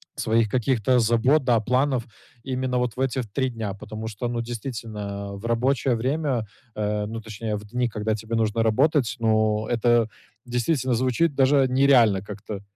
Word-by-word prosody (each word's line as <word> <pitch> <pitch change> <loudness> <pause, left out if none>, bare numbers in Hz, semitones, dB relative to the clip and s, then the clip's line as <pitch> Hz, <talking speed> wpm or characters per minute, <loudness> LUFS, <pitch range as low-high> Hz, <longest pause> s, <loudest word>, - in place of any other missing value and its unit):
своих 110 0 +1
каких-то 125 +1 +2
забот, 120 +6 +3
да, 120 -3 +3
планов 125 +3 +1 0.4
именно 130 -1 -1
вот 125 -2 -2
в - - -2
эти 130 -1 0
в 120 - -8
3 130 +6 -1
дня. 110 -4 -4
Потому 110 +2 -7
что, 110 +2 -4
ну, 120 -1 -2
действительно, 115 -2 -6 0.3
а - - -6
в 100 +3 -9
рабочее 125 +2 +1
время, 130 -1 -1 0.3
э, 105 0 -1
ну, 115 +1 -5
точнее, 110 0 -4
в 105 0 -7
дни, 125 +4 -1
когда 105 0 -1
тебе 110 +2 -4
нужно 115 0 +1
работать, 130 +3 +2
ну, 110 -1 +1
это 120 -1 +2 0.4
действительно 125 +1 0
звучит 130 +6 +1
даже 135 0 +4
нереально 125 -7 +4
как-то. 105 0 -7
115 Hz, 170 wpm, -24 LUFS, 110-130 Hz, 0.4 s, даже